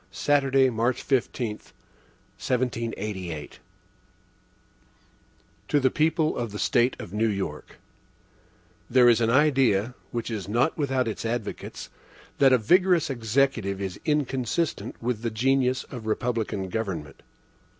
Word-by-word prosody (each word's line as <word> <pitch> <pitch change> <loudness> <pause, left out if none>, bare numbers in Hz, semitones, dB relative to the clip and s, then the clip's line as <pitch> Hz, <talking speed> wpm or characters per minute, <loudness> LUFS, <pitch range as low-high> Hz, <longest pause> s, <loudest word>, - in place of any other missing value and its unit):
Saturday, 135 +5 +2
March 115 +2 0
15, 120 -4 -1
1788. 115 -10 -5
HAMILTON 75 -3 -8 2.1
To 145 - +2
the 130 -1 +2
People 155 0 +1
of 115 -3 -3
the 105 - -6
State 120 +2 +2
of 90 - -8
New 110 +2 +1
York: 95 -8 -4 1.1
THERE 125 -1 +6
is 120 -1 +4
an 115 - +2
idea, 130 -5 +3 0.2
which 120 0 -4
is 100 -4 -4
not 120 +8 +1
without 135 -5 0
its 110 - -4
advocates, 115 -2 -5 0.5
that 135 -1 +6
a 130 - +6
vigorous 175 - +3
Executive 115 -4 0
is 95 -2 -5
inconsistent 145 +1 -1
with 120 -2 -1
the 115 - -1
genius 130 +2 +1
of 120 -4 -7
republican 110 -4 -2
government. 90 -9 -4
120 Hz, 120 wpm, -26 LUFS, 105-135 Hz, 2.1 s, THERE